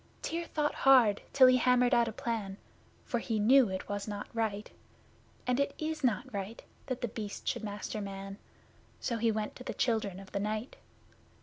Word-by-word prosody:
Tyr 335 +1 -2
thought 300 -2 -1
hard 250 -7 +5
till 265 -2 +7
he 255 0 +7
hammered 250 0 +3
out 235 -1 +4
a - - -2
plan, 215 -4 -3 0.5
For 240 - -1
he 225 -1 -2
knew 240 +3 +5
it 190 0 -4
was 205 0 -3
not 205 -1 -5
right 215 -2 -1 0.8
(And 250 +1 +1
it 280 0 0
is 310 -1 -3
not 245 +1 0
right) 200 +3 -5 0.2
that 255 -1 -3
The 240 - 0
Beast 210 -2 -6
should - - -1
master 210 0 -4
Man; 195 0 -7 0.6
So 235 - -2
he 230 0 +3
went 215 -1 -3
to 255 - -9
the - - -5
Children 215 -6 0
of 195 -1 -12
the 200 - -2
Night. 215 +4 -3
225 Hz, 190 wpm, -31 LUFS, 205-250 Hz, 0.8 s, till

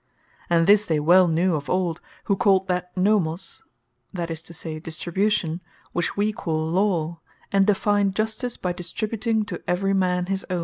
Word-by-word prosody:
And 165 -1 +4
this 205 +2 +5
they 160 -2 +1
well 175 +4 +5
knew 170 +2 +2
of 145 -2 -3
old, 175 -2 0 0.2
who 200 - +1
called 190 -1 +3
that 180 0 -1
Nomos, 185 -3 0 0.5
(that 170 -3 -4
is 160 0 -4
to 165 - -13
say, 160 -1 -6
Distribution,) 175 +1 -1 0.3
which 175 +2 -2
we 210 +1 +1
call 160 -5 -2
Law; 170 -3 0 0.3
and 195 0 +3
defined 205 -1 +2
Justice, 220 +3 -2
by 180 -1 -2
distributing 215 +5 -2
to 225 - -6
every 195 +2 +1
man 180 -2 +1
his 195 +1 -2
own. 180 -1 -1
185 Hz, 170 wpm, -24 LUFS, 170-200 Hz, 0.5 s, this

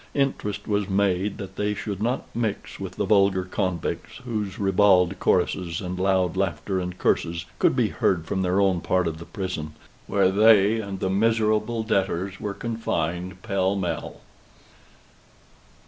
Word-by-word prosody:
Interest 105 -7 -1
was 105 -2 0
made 95 0 +1
that 100 -2 -8
they 105 0 0
should 100 -2 -5
not 120 +4 -1
mix 115 -3 -3
with - - -5
the - - -1
vulgar 100 -2 +3
convicts, 90 -2 -3
whose 105 -5 -3
ribald 95 -2 +3
choruses 90 -2 +1
and 90 -1 -5
loud 95 -2 +2
laughter 95 0 -1
and 90 0 -4
curses 85 0 0
could - - +3
be - - +2
heard 85 -4 0
from 95 +4 -2
their 90 +1 +1
own 95 -3 +2
part 90 +1 +1
of 80 -1 -4
the 85 - -9
prison, 90 -7 -5 0.3
where 100 -2 +3
they 105 +1 +5
and 100 -2 -6
the 95 - 0
miserable 110 +2 +1
debtors 95 -2 -1
were 100 -1 -3
confined 90 -5 -3
pell 95 0 0
mell. 90 -5 -4
95 Hz, 150 wpm, -25 LUFS, 90-105 Hz, 0.3 s, they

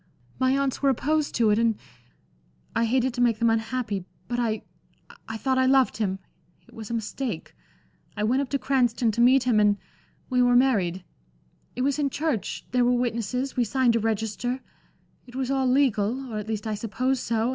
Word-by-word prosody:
My 260 +1 +3
aunts 275 -2 -1
were 280 - +4
opposed 300 +4 0
to 225 -3 +3
it, 210 - +3
and 230 -2 +2 1.0
I 230 +1 +2
hated 255 +2 +1
to 245 - -2
make 235 -3 +3
them 230 0 +3
unhappy. 225 -3 -2 0.2
But 240 0 -2
I 220 -3 -1 0.7
I 220 - -4
thought 260 +3 0
I 260 - +3
loved 265 -4 +3
him. 195 -4 -1 0.5
It - - -20
was 220 -3 -8
a 235 - -2
mistake. 225 -3 -4 0.6
I 210 - -1
went 250 +6 +2
up 275 - -4
to 280 - 0
Cranston 245 -4 +1
to 235 - -1
meet 255 +2 +5
him, 240 -4 +3
and 205 -1 +4 0.5
we 250 -1 +2
were 245 0 +4
married. 195 -9 +2 0.7
It 250 - -1
was 280 +2 0
in 285 -1 +1
church 280 -5 -2
there 250 -1 +3
were 245 - +3
witnesses, 245 +2 -1
we 245 - +2
signed 240 +1 +2
a - - +3
register 225 +3 -2 0.7
it 245 - -13
was 265 0 -2
all 265 -1 +1
legal, 255 -1 +1
or 215 - -2
at 210 - -7
least 220 -1 -3
I 220 - -1
suppose 240 +5 -1
so. 230 0 0
245 Hz, 195 wpm, -25 LUFS, 220-260 Hz, 1.0 s, meet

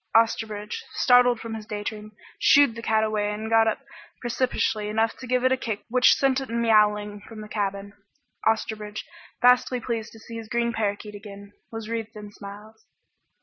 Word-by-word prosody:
Osterbridge, 225 - +1
startled 245 -2 +5
from 230 0 -6
his 215 -1 -7
daydream, 210 0 -5 0.3
shooed 285 0 +6
away - - -14
the 230 - -6
cat 220 -1 +2
and 215 0 -2
got 225 0 +5
up 220 - 0 0.4
precipitously 240 -3 -1
enough 220 +1 +1
to 255 - -9
give 250 0 +1
it 260 - +4
a 260 - +3
kick 220 -5 -4
which 250 +1 +5
sent 270 -1 +2
it 265 - -7
miaowling 210 -3 +2
from 220 -2 -10
the 210 - -8
cabin. 200 -1 -3 0.5
Osterbridge, 220 -1 -1 0.4
vastly 250 0 +5
pleased 230 -2 -4
to 225 - -13
see 230 +1 -9
his 225 -1 -8
green 235 0 0
parakeet 210 -1 -2
again, 200 -1 -11 0.2
was 225 -1 -6
wreathed 225 -1 -4
in 210 -1 -9
smiles. 210 +2 -11
220 Hz, 175 wpm, -25 LUFS, 210-235 Hz, 0.5 s, shooed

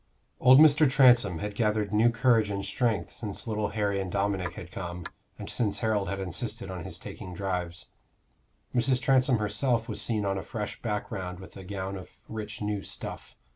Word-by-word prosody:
Old 130 +1 +8
Mr. 150 -1 +7
Transome 120 - +5
had 105 +3 -4
gathered 105 -1 0
new 110 +3 +5
courage 115 -2 +3
and 100 -1 -3
strength 110 +2 -1
since 105 -4 -6
little 105 -2 -1
Harry 100 -2 -1
and 95 -2 -4
Dominic 100 -3 -1
had 85 -1 -9
come, 90 -3 -6 0.3
and - - -7
since 105 -4 0
Harold 105 -4 0
had 100 +1 -3
insisted 100 +3 -4
on 90 -3 -6
his - - -7
taking 90 -1 -8
drives. 90 -3 -4 0.8
Mrs. 125 +1 +2
Transome 130 -1 +3
herself 115 +2 0
was 110 - -3
seen 110 -3 0
on 95 0 0
a - - -4
fresh 105 0 -5
background 95 -4 -4
with 95 - -12
a 95 - -9
gown 95 0 -4
of 90 - -10 0.2
rich 105 -1 -6
new 105 -1 -1
stuff. - - -6
105 Hz, 180 wpm, -28 LUFS, 95-115 Hz, 0.8 s, Old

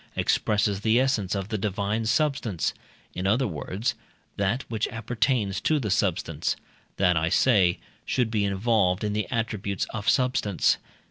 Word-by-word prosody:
expresses 105 -2 +1
the 110 +2 +3
essence 115 -8 +1
of 95 0 -3
the 110 -3 -2
divine 105 +2 -1
substance 125 - 0 0.4
in 90 +1 -2
other 120 +7 +3
words, 95 - -2 0.4
that 100 +7 0
which 110 -1 -1
appertains 115 -3 -1
to 155 -1 +2
substance: 85 -6 0 0.4
that, 90 -2 +3
I 80 +1 +1
say, 95 -3 +4 0.3
should 120 -3 0
be 105 -2 +1
involved 100 -1 +1
in 105 -1 -1
the 105 0 -1
attributes 105 -4 -2
of 110 -2 -1
substance. 125 -7 +2
105 Hz, 140 wpm, -26 LUFS, 95-115 Hz, 0.4 s, say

